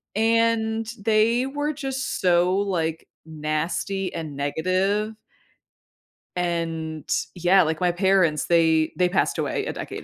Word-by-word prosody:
and 225 0 +1
they 225 +4 +2
were 290 +2 -2
just 270 -2 -4
so, 180 0 +3
like, 170 -5 -1 0.2
nasty 160 +5 -3
and 155 -3 -6
negative 185 +9 0 1.2
and, 165 -3 -3 0.3
yeah, 180 +2 +4
like, 160 0 -1
my 180 -1 +2
parents, 180 -4 +2
they 160 -2 +3
they 180 - +3
passed 185 +2 0
away - - -2
a - - -3
decade - - -7
185 Hz, 120 wpm, -24 LUFS, 160-215 Hz, 1.2 s, yeah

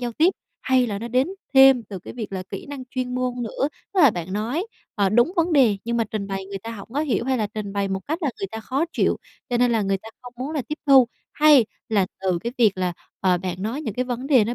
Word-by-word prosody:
giao 240 -1 -3
tiếp 330 +9 +4 0.3
hay 260 -2 +3
là 200 -2 -3
nó 235 - -5
đến 255 +6 +2 0.3
thêm 265 -2 +8
từ 200 -3 -8
cái - - -10
việc 225 -5 -6
là 185 -1 -3
kỹ 195 - -6
năng 280 -3 -7
chuyên 255 -1 -3
môn 250 -1 -2
nữa, 265 +5 -1 0.3
tức 380 - +4
là 285 -7 +8
bạn 175 -1 -5
nói, 240 - -1 0.3
ờ, 200 -2 +2
đúng 240 - +3
vấn 335 0 +2
đề, 250 -8 +5
nhưng 235 0 -1
mà 230 - +2
trình 215 -3 -4
bày 195 -1 -4
người 195 0 -5
ta 225 +4 -7
hổng 210 -3 -8
có 285 - 0
hiểu 275 -6 0
hay 260 -1 0
là 215 - 0
trình 205 -1 -6
bày 200 -1 -1
một 190 0 -2
cách 315 +4 -1
là 285 - +1
người 195 - -2
ta 225 0 -5
khó 265 +8 -1
chịu, - - +2 0.3
cho 245 - +1
nên 245 0 +3
là 225 - +2
người 195 -1 0
ta 220 - -12
không 245 - -10
muốn 260 +4 -4
là 300 -4 -2
tiếp 300 - -4
thu? 265 -3 +7 0.2
Hay 295 -7 +6 0.2
là 200 -4 +2
từ 185 -2 0
cái 235 +7 -4
việc 210 -6 +4
là, 180 -1 0 0.3
ờ, 180 -2 +3
bạn 185 +1 -4
nói 235 +8 -2
những 220 -9 -4
cái 250 +2 0
vấn 250 +1 -4
đề 260 -7 +5
nó 235 +3 -2
235 Hz, 280 wpm, -23 LUFS, 200-265 Hz, 0.3 s, thêm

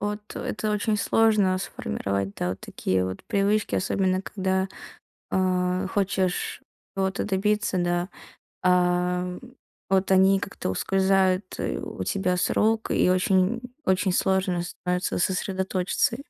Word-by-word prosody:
от 210 0 -4
это 215 -1 -2
очень 210 +1 0
сложно 210 -3 +3
сформировать, 100 - -3
да, 90 - -2
вот 95 - -6
такие 95 0 -1
вот 95 0 -5
привычки, 205 +2 +1
особенно 185 0 +1
когда, 190 -1 -1 0.7
э, 185 0 +1
хочешь 190 -2 0 0.3
ото 190 0 -1
добиться, 205 0 0
да. 175 +1 0 0.5
А 180 0 +2 0.5
вот 190 0 +2
они 190 +1 +5
как-то 195 - -4
ускользают. 190 - +1
И - - -2
у - - -5
тебя 185 -2 0
сроки, 220 +4 +1
и - - +3
очень 185 +4 +2 0.2
очень 190 0 +2
сложно 190 -1 +1
становится 180 +1 -2
сосредоточиться. 190 +3 0
190 Hz, 120 wpm, -25 LUFS, 180-195 Hz, 0.7 s, они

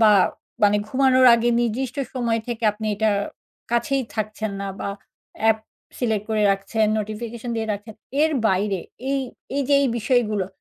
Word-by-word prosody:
বা, 220 -1 +7 0.5
মানে 205 0 +5
ঘুমানোর 260 0 +4
আগে। 235 +1 +1
নির্দিষ্ট 240 +3 -2 0.2
সময় 235 -3 0
থেকে 235 -1 -3
আপনি 215 +1 -6
এটা 220 +1 +2 0.6
কাছেই 260 +3 +1
থাকছেন 215 -1 -3
না 200 - -3
বা, - - -2 0.5
অ্যাপ 220 0 +4 0.4
select 220 -4 0
করে 215 -1 +2
রাখছেন, 195 +3 +1
notification 225 +3 -5
দিয়ে 220 0 -1
রাখছেন। 210 +2 -7 0.3
এর 315 - +3 0.2
বাইরে 195 -1 +1 0.3
এই 275 - +1 0.4
এই 285 - +2
যে 285 - +5
এই 275 - +2
বিষয়গুলো, 215 -4 +1
220 Hz, 155 wpm, -23 LUFS, 210-240 Hz, 0.6 s, বা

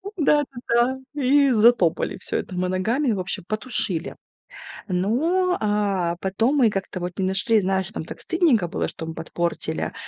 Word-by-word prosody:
Да-да-да. 265 -5 +1 0.2
И 275 +1 +4
затопали 220 -9 +3
всё - - -3
это 185 - -5
мы 180 0 0
ногами, 230 +9 0
в 200 - -1
общем 180 -2 -3
потушили. 215 -6 -1 0.7
Ну, 310 - +1
а 200 -5 0
потом 225 +9 +1
мы 240 -5 +5
как-то 195 -2 -4
вот 175 0 -5
не 190 - +1
нашли, 205 +4 +2
знаешь, 190 0 -1
нам - - -4
так - - -9
стыдненько 305 - +2
было, - - -2
что 160 - -7
мы 160 - -6
подпортили. 170 +1 -3
210 Hz, 155 wpm, -23 LUFS, 185-260 Hz, 0.7 s, мы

